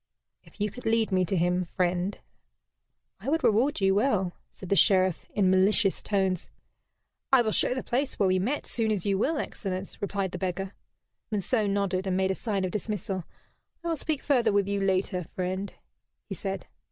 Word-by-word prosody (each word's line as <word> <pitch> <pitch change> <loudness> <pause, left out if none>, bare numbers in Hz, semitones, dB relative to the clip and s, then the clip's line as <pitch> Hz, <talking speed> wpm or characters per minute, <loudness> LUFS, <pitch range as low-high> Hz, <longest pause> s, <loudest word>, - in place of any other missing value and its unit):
"If - - -19
you 205 0 0
could 250 +3 -7
lead 225 -1 +2
me 185 -1 +3
to 190 - -1
him, 180 +1 +2
friend, 180 +2 -1 1.0
I - - -4
would 320 +2 +1
reward 240 +7 +3
you 195 0 +4
well," 200 -5 +1 0.2
said 185 - -11
the 200 - +3
Sheriff, 185 -3 +3
in 190 -3 +4
malicious 195 +2 +4
tones. 190 -3 0 0.8
"I 265 -3 +6
will 220 - 0
show 250 - +1
the 260 - -3
place 265 +3 -1
where 200 - +3
we 185 0 +3
met 255 +10 -1
soon 225 -2 0
as 200 -5 -1
you 195 -1 +1
will, 305 +8 +1
excellence," 190 -8 -5
replied 200 -2 -2
the - - -5
beggar. 190 +1 -3 0.6
Monceux 210 +1 +1
nodded, 195 -1 0
and 185 -1 +1
made 190 0 +2
a - - +1
sign 200 -2 -1
of 180 - -3
dismissal. 205 -3 -3 0.6
"I 340 - -2
will 330 - +1
speak 305 -1 -3
further 260 -6 +3
with 200 -1 +2
you 200 0 0
later, 190 -1 0
friend," 185 +2 -2 0.5
he - - -6
said. - - -4
195 Hz, 190 wpm, -28 LUFS, 185-220 Hz, 1.0 s, I